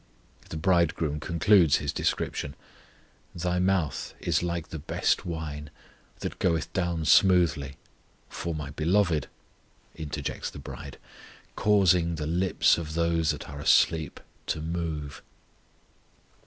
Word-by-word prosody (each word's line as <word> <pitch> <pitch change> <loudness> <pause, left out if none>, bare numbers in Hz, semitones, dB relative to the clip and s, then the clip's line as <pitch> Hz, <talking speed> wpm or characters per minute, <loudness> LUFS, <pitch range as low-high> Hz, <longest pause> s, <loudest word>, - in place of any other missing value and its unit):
The 80 - -5
Bridegroom 80 -3 +1
concludes 85 0 +4
his 70 -1 -2
description: 70 - -2 0.8
Thy 90 +1 -1
mouth 90 -5 0
[is] - - +1
like 85 -2 -3
the 80 - -6
best 75 - 0
wine, 75 -3 -5 0.5
That - - -5
goeth 85 -3 0
down 85 -3 -1
smoothly 80 -8 +4 0.5
For 85 -1 -4
my 75 -2 -5
Beloved 80 0 +1 0.7
interjects 75 -3 -4
the - - -11
bride, 70 - -9 0.6
Causing 90 -5 +3
the 75 -1 -4
lips 90 +2 +2
of 80 -1 -6
those 85 -1 +1
that 75 - -2
are 70 0 -8
asleep 80 +1 +3 0.3
to - - -1
move. 80 -3 -4
80 Hz, 115 wpm, -27 LUFS, 75-90 Hz, 0.8 s, concludes